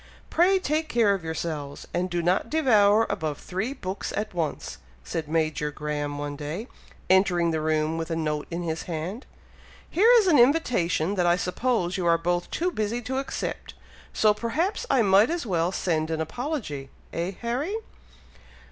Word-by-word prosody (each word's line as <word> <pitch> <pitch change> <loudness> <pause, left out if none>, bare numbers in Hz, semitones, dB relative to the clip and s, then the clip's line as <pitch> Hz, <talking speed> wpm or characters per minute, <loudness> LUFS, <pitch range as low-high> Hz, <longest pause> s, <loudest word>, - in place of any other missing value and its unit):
Pray 370 +3 +4
take 315 -3 -1
care 230 -7 +3
of 195 -4 -3
yourselves, 155 -3 -4
and 180 +1 0
do 175 -1 -1
not 185 +6 +1
devour 225 -8 +4
above 160 -7 -2
three 195 +7 -3
books 195 -8 -5
at 215 0 -3
once," 165 -4 -3 0.2
said 155 - -4
Major 155 -1 0
Graham 145 -1 -3
one 145 0 -4
day, 155 - -5 0.4
entering 180 -3 +3
the 160 -1 -1
room 155 +1 0
with 165 0 -4
a 165 - -1
note 150 -2 -2
in 175 +1 -4
his 160 -1 -3
hand. 175 - -4 0.6
"Here 430 +7 +4
is 440 - +4
an 320 -8 +5
invitation 230 - +3
that 180 -3 +1
I 175 - +5
suppose 180 0 -1
you 180 -2 -1
are 170 0 +5
both 175 +1 -1
too 360 +2 -1
busy 225 -1 -2
to 260 +3 -2
accept, 275 - -5 0.4
so 215 -1 +4
perhaps 320 - -1
I 250 - +4
might 200 +3 +5
as 335 -4 -2
well 175 -4 +1
send 160 -4 -1
an 160 -1 -2
apology; 160 - -4 0.2
eh, 170 +3 -2
Harry?" 260 - -2
180 Hz, 170 wpm, -26 LUFS, 160-240 Hz, 0.6 s, an